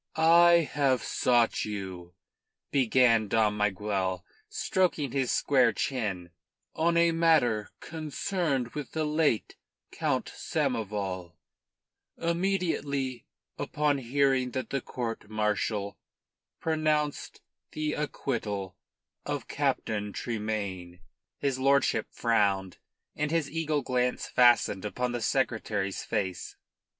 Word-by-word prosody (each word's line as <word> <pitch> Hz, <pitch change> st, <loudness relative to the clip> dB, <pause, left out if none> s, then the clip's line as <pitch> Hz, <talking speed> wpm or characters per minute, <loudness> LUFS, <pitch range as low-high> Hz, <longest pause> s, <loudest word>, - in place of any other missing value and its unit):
"I 170 Hz, 0 st, +6 dB
have 135 Hz, -5 st, +2 dB
sought 120 Hz, -2 st, +2 dB
you," 95 Hz, -4 st, -6 dB, 0.6 s
began 120 Hz, -4 st, +4 dB
Dom 105 Hz, 0 st, +2 dB
Miguel, 100 Hz, -2 st, -1 dB, 0.2 s
stroking 185 Hz, -, 0 dB
his 135 Hz, -1 st, 0 dB
square 130 Hz, -4 st, +3 dB
chin, 100 Hz, -10 st, -2 dB, 0.4 s
"on 170 Hz, +1 st, +1 dB
a 170 Hz, 0 st, +5 dB
matter 155 Hz, -11 st, +3 dB
concerned 155 Hz, -4 st, -2 dB
with 145 Hz, -1 st, -7 dB
the 160 Hz, -1 st, 0 dB
late 150 Hz, -6 st, 0 dB, 0.3 s
Count -, -, -1 dB
Samoval, 95 Hz, -5 st, -2 dB, 0.8 s
immediately 165 Hz, -8 st, -1 dB, 0.3 s
upon 150 Hz, -1 st, 0 dB
hearing 135 Hz, 0 st, +1 dB
that 130 Hz, -, -4 dB
the 140 Hz, -, -1 dB
court 115 Hz, -4 st, -5 dB
martial 105 Hz, -1 st, -1 dB, 0.6 s
pronounced 155 Hz, -2 st, -1 dB, 0.3 s
the 155 Hz, 0 st, -1 dB
acquittal 105 Hz, -10 st, -3 dB, 0.5 s
of -, -, -4 dB
Captain 105 Hz, -2 st, -1 dB
Tremayne." 100 Hz, -6 st, -4 dB, 0.4 s
His 135 Hz, -2 st, -1 dB
lordship 135 Hz, -4 st, +2 dB
frowned, 100 Hz, -5 st, +1 dB, 0.4 s
and 150 Hz, 0 st, -1 dB
his 165 Hz, -2 st, 0 dB
eagle 155 Hz, -3 st, -1 dB
glance 125 Hz, 0 st, 0 dB
fastened 120 Hz, -6 st, +4 dB
upon 125 Hz, +4 st, -2 dB
the 120 Hz, -1 st, -3 dB
Secretary's 110 Hz, -6 st, -1 dB
face. 95 Hz, -6 st, -3 dB
125 Hz, 100 wpm, -28 LUFS, 105-150 Hz, 0.8 s, I